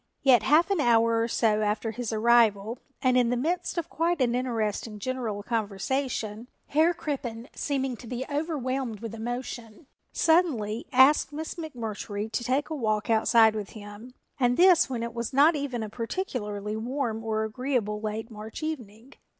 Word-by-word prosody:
Yet 255 Hz, -5 st, +6 dB
half 315 Hz, -, +4 dB
an 390 Hz, -, +2 dB
hour 230 Hz, -2 st, +3 dB
or 230 Hz, -, +1 dB
so 220 Hz, -2 st, +1 dB
after 215 Hz, +1 st, -1 dB
his 235 Hz, 0 st, -4 dB
arrival 225 Hz, 0 st, +3 dB, 0.2 s
and 255 Hz, -1 st, +3 dB
in 245 Hz, -2 st, +4 dB
the 245 Hz, -, 0 dB
midst 340 Hz, +8 st, -1 dB
of 340 Hz, -, -1 dB
quite 335 Hz, +1 st, 0 dB
an 245 Hz, -2 st, +2 dB
interesting 225 Hz, -3 st, -2 dB
general 220 Hz, -2 st, -3 dB
conversation 225 Hz, +1 st, -2 dB, 0.2 s
Herr 320 Hz, +4 st, +3 dB
Crippen, 250 Hz, -7 st, -4 dB
seeming 270 Hz, -3 st, -2 dB
to 240 Hz, -, -12 dB
be 250 Hz, +2 st, -4 dB
overwhelmed 270 Hz, -, -2 dB
with 225 Hz, -1 st, -6 dB
emotion, 235 Hz, +2 st, -6 dB, 0.3 s
suddenly 270 Hz, -, +1 dB
asked 265 Hz, +2 st, +5 dB
Miss 310 Hz, +2 st, -5 dB
McMurtry 225 Hz, -, -5 dB
to 240 Hz, -, -2 dB
take 265 Hz, +6 st, 0 dB
a -, -, -1 dB
walk 215 Hz, -4 st, -1 dB
outside 225 Hz, 0 st, +5 dB
with 210 Hz, -2 st, -5 dB
him 215 Hz, +4 st, -11 dB, 0.2 s
and 245 Hz, -1 st, +2 dB
this 355 Hz, -3 st, +6 dB
when 240 Hz, -3 st, -3 dB
it 235 Hz, 0 st, -4 dB
was 235 Hz, +2 st, -4 dB
not 295 Hz, +5 st, +5 dB
even 270 Hz, -5 st, -3 dB
a -, -, -4 dB
particularly 215 Hz, -, -4 dB
warm 230 Hz, -1 st, -3 dB
or 220 Hz, -1 st, -1 dB
agreeable 220 Hz, -2 st, -2 dB
late 220 Hz, +2 st, -4 dB
March 215 Hz, +6 st, -8 dB
evening. 250 Hz, -5 st, -6 dB
235 Hz, 165 wpm, -27 LUFS, 220-270 Hz, 0.3 s, Yet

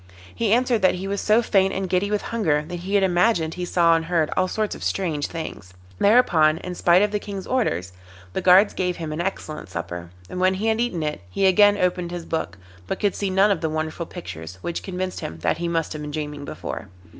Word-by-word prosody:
He 225 Hz, -3 st, 0 dB
answered 240 Hz, -1 st, +3 dB
that 185 Hz, -1 st, +4 dB
he 185 Hz, +2 st, -5 dB
was 200 Hz, 0 st, -2 dB
so 220 Hz, +2 st, +3 dB
faint 195 Hz, -3 st, +2 dB
and 190 Hz, 0 st, -2 dB
giddy 185 Hz, +3 st, +1 dB
with 210 Hz, -1 st, -1 dB
hunger 155 Hz, -10 st, +1 dB
that 175 Hz, 0 st, -5 dB
he 190 Hz, +4 st, -3 dB
had 200 Hz, -, +4 dB
imagined 175 Hz, -2 st, +2 dB
he 180 Hz, -1 st, -4 dB
saw 170 Hz, -1 st, +3 dB
and 165 Hz, 0 st, -1 dB
heard 165 Hz, -3 st, +1 dB
all 185 Hz, -, +2 dB
sorts 215 Hz, +2 st, -1 dB
of -, -, -8 dB
strange 160 Hz, -7 st, -1 dB
things. 100 Hz, -, -7 dB, 0.2 s
Thereupon, 170 Hz, -9 st, +4 dB
in 180 Hz, +2 st, -6 dB
spite 175 Hz, +2 st, +4 dB
of 210 Hz, -, +1 dB
the 210 Hz, -, 0 dB
King's 200 Hz, -2 st, -6 dB
orders, 90 Hz, -, -1 dB, 0.4 s
the -, -, -1 dB
guards 190 Hz, +3 st, +6 dB
gave 180 Hz, -1 st, -1 dB
him 160 Hz, -2 st, -5 dB
an 155 Hz, -, -2 dB
excellent 155 Hz, -, -4 dB
supper, 90 Hz, -2 st, -6 dB, 0.2 s
and 180 Hz, -, -6 dB
when 185 Hz, +1 st, +3 dB
he 200 Hz, +4 st, -3 dB
had 225 Hz, +1 st, +2 dB
eaten 185 Hz, -10 st, -1 dB
it 150 Hz, -6 st, -3 dB
he 140 Hz, -, 0 dB
again 205 Hz, +2 st, +6 dB
opened 180 Hz, -2 st, 0 dB
his 175 Hz, -1 st, -6 dB
book, 95 Hz, -, -3 dB, 0.3 s
but -, -, -3 dB
could 205 Hz, -2 st, +1 dB
see 200 Hz, -, -2 dB
none 195 Hz, +2 st, +4 dB
of 190 Hz, -, 0 dB
the 160 Hz, -, 0 dB
wonderful 155 Hz, +1 st, -3 dB
pictures, 85 Hz, 0 st, -8 dB
which 170 Hz, -, -3 dB
convinced 185 Hz, -1 st, -4 dB
him 80 Hz, -, -6 dB
that -, -, +1 dB
he 170 Hz, -, -1 dB
must 165 Hz, -1 st, -1 dB
have 155 Hz, -, -6 dB
been 150 Hz, -, -5 dB
dreaming 150 Hz, -1 st, -5 dB
before. -, -, -6 dB
180 Hz, 235 wpm, -23 LUFS, 155-200 Hz, 0.4 s, guards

